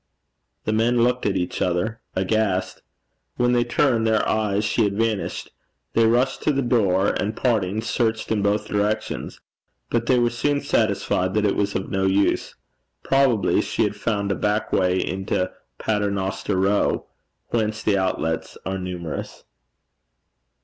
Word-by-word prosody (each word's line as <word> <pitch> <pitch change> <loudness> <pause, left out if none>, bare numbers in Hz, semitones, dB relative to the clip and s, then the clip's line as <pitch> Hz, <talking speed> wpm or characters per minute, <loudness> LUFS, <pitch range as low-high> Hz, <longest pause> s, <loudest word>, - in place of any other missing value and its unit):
The 110 - 0
men 115 +2 +3
looked 125 -1 +1
at 100 - 0
each 90 - -3
other 90 +6 -1
aghast. 95 -1 0 0.5
When 120 0 +2
they 120 -1 +3
turned 120 -2 +2
their 110 -1 +2
eyes 105 -1 +1
she 110 +2 +2
had 100 -1 0
vanished. 110 -3 -1 0.4
They 115 0 +4
rushed 120 +4 +2
to - - +2
the 140 -1 0
door, 100 -5 +2
and, 105 +3 -2
parting, 110 -4 +1
searched 115 -2 -1
in 110 -2 +1
both 100 +1 +1
directions. 105 +1 -2 0.5
But 120 0 0
they 130 - +4
were 120 -1 +2
soon 140 +4 0
satisfied 100 -7 0
that 105 -1 +2
it 100 - +2
was 100 0 -1
of 95 - -3
no 95 -1 +1
use. 100 +1 +1 0.5
Probably 135 -7 +3
she - - -1
had - - -1
found 100 -3 -1
a - - +1
back 105 +2 -1
way 90 0 +2
into 95 0 -1 0.3
Paternoster 100 -2 -1
Row, 95 +2 +1 0.4
whence 110 -2 -1
the 100 -2 +2
outlets 80 -3 -2
are 95 0 -2
numerous. 90 -3 -6
105 Hz, 150 wpm, -23 LUFS, 95-115 Hz, 0.5 s, They